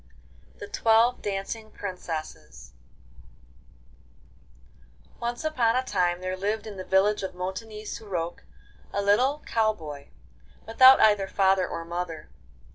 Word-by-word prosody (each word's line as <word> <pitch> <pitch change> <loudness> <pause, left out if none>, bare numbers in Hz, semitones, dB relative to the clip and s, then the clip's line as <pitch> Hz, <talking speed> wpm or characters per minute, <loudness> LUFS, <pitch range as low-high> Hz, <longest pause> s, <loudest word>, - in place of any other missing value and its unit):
A. - - -30
L. - - -28
THE - - -6
TWELVE 235 - +3
DANCING 205 +2 -4
PRINCESSES 155 - -7 2.4
I - - -28
Once 240 +4 -3
upon 245 -7 +1
a 255 - +1
time 180 -6 0
there 185 0 -3
lived 205 +4 -2
in 210 -3 -8
the 185 - -5
village 195 +3 +2
of 190 -1 -5
Montignies 210 +4 -6
sur 220 - -10
Roc 175 -3 -4 0.5
a 200 - -1
little 255 +9 +2
cow 220 -1 +1
boy, 150 -6 -10 0.6
without 260 +4 +7
either 205 -3 +4
father 190 -1 +2
or 165 0 -6
mother. 170 -2 -5
200 Hz, 135 wpm, -26 LUFS, 180-225 Hz, 2.4 s, without